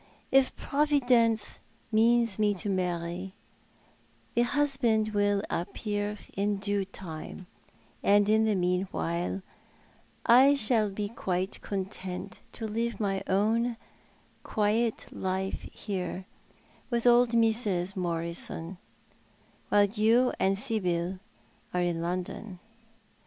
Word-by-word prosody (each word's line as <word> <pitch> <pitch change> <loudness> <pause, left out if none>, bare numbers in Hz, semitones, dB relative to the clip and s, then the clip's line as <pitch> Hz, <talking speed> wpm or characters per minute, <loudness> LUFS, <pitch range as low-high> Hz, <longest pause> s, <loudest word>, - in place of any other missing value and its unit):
"If 270 -1 +4
Providence 245 -7 +2 0.3
means 230 -1 +3
me 210 -1 +2
to 200 +2 -3
marry, 180 0 -2 1.0
the 235 - +3
husband 240 -5 +1
will 205 -1 +1
appear 205 +3 -3 0.2
in 205 +1 0
due 200 0 -1
time 180 -1 -8 0.3
— - - -32
and 205 0 +4
in 220 +1 +4
the 215 -2 +2
meanwhile 180 0 -1 0.8
I 265 +4 +7
shall 220 -5 +3
be 205 +1 -3
quite 190 -3 -3
content 190 -2 -5
to 225 - -5
live 230 +2 -2
my 195 -2 -1
own 225 +5 +1 0.6
quiet 220 +2 0
life 190 0 -3
here, 190 -2 -4 0.6
with 235 -1 -1
old 240 0 +5
Mrs. 220 -5 +2
Morisou, 170 0 -2 0.9
while 205 0 +5
you 225 +4 +3
and 195 +1 +2
Sibyl 185 -5 -1 0.6
are 180 - +2
in 170 -1 -1
London." 180 +3 -4
205 Hz, 105 wpm, -29 LUFS, 185-230 Hz, 1.0 s, I